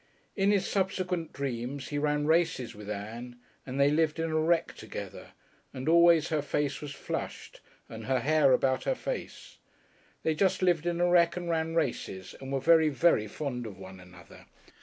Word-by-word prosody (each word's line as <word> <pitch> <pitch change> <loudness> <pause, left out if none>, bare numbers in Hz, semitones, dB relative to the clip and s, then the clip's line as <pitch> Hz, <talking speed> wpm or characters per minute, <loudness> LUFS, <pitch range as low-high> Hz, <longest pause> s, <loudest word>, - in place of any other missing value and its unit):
In 195 -1 +2
his 200 -2 +2
subsequent 185 -4 -1
dreams 135 0 -4
he 145 - -2
ran 150 0 0
races 160 -6 +1
with 105 0 -10
Ann, 115 +4 -6 0.3
and 130 +2 -4
they 140 +1 +5
lived 155 +1 +1
in 165 0 -1
a 155 - +1
wreck 165 +1 +1
together, - - -9 0.4
and 130 +2 -5
always 170 -1 +5
her 155 -3 0
face 145 0 -2
was 150 -2 -6
flushed - - -6 0.3
and 110 -1 -9
her 130 +1 +1
hair 150 -2 +4
about 130 0 +2
her - - +1
face. - - -6 0.6
They 160 - +2
just 185 +3 +1
lived 175 -2 +2
in 170 0 -1
a 175 - +3
wreck 170 -1 +4
and 175 -1 -3
ran 165 0 -1
races, 115 - -2
and 135 0 -7
were 135 - 0
very, 160 +3 +5
very 145 -7 +2
fond 125 0 -4
of 100 -4 -10
one 95 0 -11
another. 90 0 -15
150 Hz, 180 wpm, -29 LUFS, 130-170 Hz, 0.6 s, they